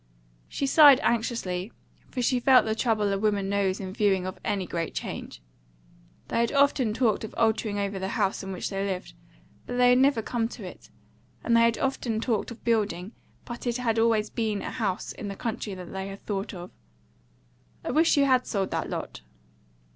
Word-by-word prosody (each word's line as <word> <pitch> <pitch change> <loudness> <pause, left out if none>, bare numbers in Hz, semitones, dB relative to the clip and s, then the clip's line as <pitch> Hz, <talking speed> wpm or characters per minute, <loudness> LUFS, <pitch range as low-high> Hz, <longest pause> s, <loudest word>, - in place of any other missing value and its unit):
She 280 - -2
sighed 285 -1 +8
anxiously, 220 -4 -1 0.4
for 250 - -3
she 250 +1 +2
felt 255 +1 +5
the 220 - 0
trouble 215 -3 +1
a 195 - -1
woman 200 -2 0
knows 200 -1 0
in 190 -2 -6
view 195 -3 +1
of 185 - -7
any 200 -3 -1
great 170 -1 -4
change. - - -6 0.9
They - - 0
had 235 0 +1
often 280 -5 +3
talked 225 -2 +1
of 220 - -7
altering 220 -2 +1
over 200 -1 -2
the 190 - -3
house 195 -3 0
in 195 - -6
which 185 - -4
they 195 0 -2
lived, 190 -2 -4 0.5
but 245 - -4
they 250 0 +5
had 250 +1 +5
never 265 -4 +3
come 230 -1 -1
to - - -10
it; - - -11 0.5
and 235 - +2
they 230 - +6
had 230 -1 +3
often 245 -4 -1
talked 225 -2 -1
of 235 -1 -11
building, 210 -5 0 0.3
but 240 +1 -7
it 240 0 0
had 230 -3 0
always 225 -2 +2
been 215 -3 -2
a - - -4
house 195 -4 -2
in 210 - -7
the 200 - -5
country 215 -2 -4
that 180 -2 -9
they 190 0 -4
had 195 0 -10
thought 200 -1 -3
of. 180 -2 -9 1.1
"I - - -1
wish 320 0 +3
you 280 - +5
had 255 -2 +3
sold 195 -3 -1
that - - -2
lot." - - -5
220 Hz, 200 wpm, -27 LUFS, 195-240 Hz, 1.1 s, sighed